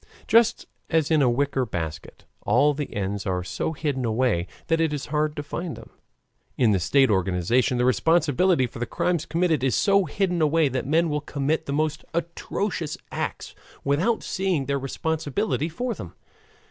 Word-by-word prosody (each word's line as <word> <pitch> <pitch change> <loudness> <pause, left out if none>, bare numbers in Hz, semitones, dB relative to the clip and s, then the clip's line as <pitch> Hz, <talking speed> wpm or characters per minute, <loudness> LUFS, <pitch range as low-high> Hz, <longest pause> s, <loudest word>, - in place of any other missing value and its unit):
Just 230 +1 +4 0.2
as 160 -2 +1
in 155 -2 +4
a 130 - +4
wicker 135 +2 +1
basket 80 -8 -6 0.2
all 140 +7 +3
the 145 0 -4
ends 100 0 -3
are 90 -1 -1
so 125 - -3
hidden 145 -4 -2
away 110 -6 +1 0.2
that 165 0 +1
it 160 -2 +2
is 145 - -3
hard 150 0 +1
to 145 - -4
find 165 +3 -5
them, - - -13 0.7
in 120 -4 +4
the 95 - +2
state 135 +7 +3
organization 95 +7 +1
the 125 - +2
responsibility 165 +2 +3
for 120 - -8
the 120 - -2
crimes 170 -3 -1
committed 165 -4 +1
is 130 -3 +2
so 200 -1 +3
hidden 180 -3 -1
away 155 -1 +3
that 130 0 -3
men 165 +3 +3
will 150 0 -1
commit 145 +2 -2
the - - -2
most 155 +1 -1
atrocious 170 -1 -3
acts - - -4 0.3
without 170 +12 +1
seeing 185 -8 -1
their 140 0 -1
responsibility 160 +5 -2
for 240 +9 -3
them. 90 - -9
145 Hz, 170 wpm, -25 LUFS, 125-165 Hz, 0.7 s, Just